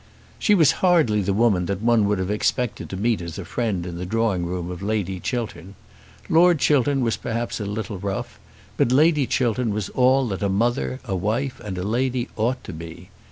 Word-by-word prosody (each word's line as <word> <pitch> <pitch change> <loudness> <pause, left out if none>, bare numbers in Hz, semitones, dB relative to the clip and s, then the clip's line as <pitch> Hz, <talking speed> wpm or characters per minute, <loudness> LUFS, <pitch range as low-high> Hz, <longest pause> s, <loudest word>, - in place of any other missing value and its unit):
She 210 - +4
was 160 -7 +5
hardly 160 - +3
the 100 +1 0
woman 100 -4 +2
that 100 +2 -3
one 115 -3 +3
would 105 0 +1
have 95 +1 -2
expected 110 +2 -1
to 95 - -5
meet 110 0 0
as 85 -1 -7
a 100 - -6
friend 100 -4 -2
in 85 -1 -6
the - - -4
drawing 100 -5 0
room 90 0 -4
of 90 0 -7
Lady 100 -3 -2
Chiltern. 100 -5 -4 0.5
Lord 175 +1 +5
Chiltern 140 -1 +2
was 115 -2 0
perhaps 115 0 -3
a 105 - -3
little 105 -1 -4
rough, 100 0 -4 0.4
but 120 - +2
Lady 150 0 +4
Chiltern 120 -2 0
was 105 -2 -3
all 130 +1 +3
that 95 - -4
a 100 - +1
mother, 120 +6 0
a 100 -5 -2
wife, 115 +8 -2
and 100 -4 -5
a 90 - -3
lady 125 +4 -1
ought 120 +4 -1
to - - -8
be. 85 +3 -10
110 Hz, 205 wpm, -23 LUFS, 95-125 Hz, 0.5 s, was